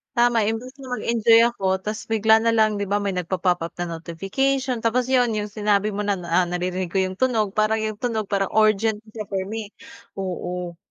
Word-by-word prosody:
Tama, 240 -1 +3
imbes 245 +4 -5
na 265 - -9
mag-enjoy 230 0 +4
ako, 195 -5 -6 0.2
tas 215 +1 -4
bigla 220 0 +4
na 230 - +2
lang 215 -1 +3
'di 200 - -1
ba, 205 - +2
may 200 -1 -1
nagpa-pop 180 0 0
up - - -9
na 175 - -2
notification. 250 - -1
Tapos 240 +2 +1
'yon, 245 -3 +3
'yong 210 -1 -3
sinabi 210 0 +1
mo 205 - -2
na, 200 -1 +1
ah, 175 +2 +2
naririnig 180 0 -2
ko - - -1
'yong 185 0 -3
tunog, 225 -6 +1
parang 215 +1 +3
'yong 215 -1 -4
tunog 225 -4 -1
parang 195 -2 0
urgent 215 0 +3 0.2
siya 215 -2 -5
for 190 -1 -1
me. 215 0 -5 0.5
Oo. 180 -2 -4
210 Hz, 200 wpm, -23 LUFS, 190-225 Hz, 0.5 s, mag-enjoy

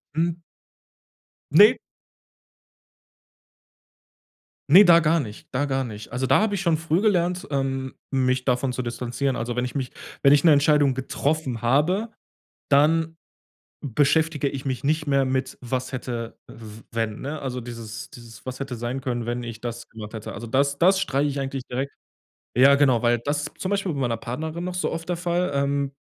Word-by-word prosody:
Hm. 165 +1 0 1.1
Ne. - - +7 2.9
Ne, 185 +8 +9
da 170 -3 +7
gar 165 0 +2
nicht 105 -3 -9
da 125 - +1
gar 135 -2 -1
nicht. 110 -2 -9
Also, 130 +2 -1
da - - +4
habe 215 -2 +1
ich 195 - -2
schon 170 -4 +2
früh 165 +1 0
gelernt, 180 -2 +1
ähm, 135 -1 -2 0.2
mich 130 -1 +1
davon 125 0 0
zu 130 - -2
distanzieren. 125 +2 -2
Also 120 +2 -3
wenn 125 - 0
ich 125 - -5
mich 130 -3 -3 0.3
wenn 140 - +7
ich 145 - +4
'ne 165 - +7
Entscheidung 145 -1 +4
getroffen 130 0 -2
habe, 155 - +2 0.6
dann 160 +3 +3 0.7
beschäftige 150 +2 +1
ich 135 -1 -6
mich 130 0 -3
nicht 155 +2 0
mehr 140 -1 +3
mit 130 0 -2
was 130 +1 -3
hätte 120 -2 -5
w 110 -1 -12
wenn, 115 -2 -2
ne? 145 +2 -5
Also 125 -2 -3
dieses 115 -2 -8
dieses 115 -2 -13
„was 130 0 -6
hätte 135 -2 -4
sein 120 +3 -4
können, 120 -3 -3
wenn 120 +1 -2
ich 115 -2 -7
das 120 -1 -6
gemacht 110 0 -9
hätte.“ 110 -1 -6
Also 120 - -7
das 140 +4 +1
das 190 +2 +4
streiche 145 -2 0
ich 140 0 -3
eigentlich 135 -1 -4
direkt. 135 +3 -3 0.7
Ja, 135 +3 +7
genau, 130 -5 +3
weil 120 0 +3
das 145 +5 -2
zum 185 - -3
Beispiel 195 -3 0
bei 145 - -5
meiner 120 -3 0
Partnerin 155 +9 -5
noch 180 0 -4
so 180 - -1
oft 165 +1 -5
der 175 - 0
Fall, 175 +1 0
ähm 140 0 0
135 Hz, 175 wpm, -24 LUFS, 120-155 Hz, 2.9 s, Ne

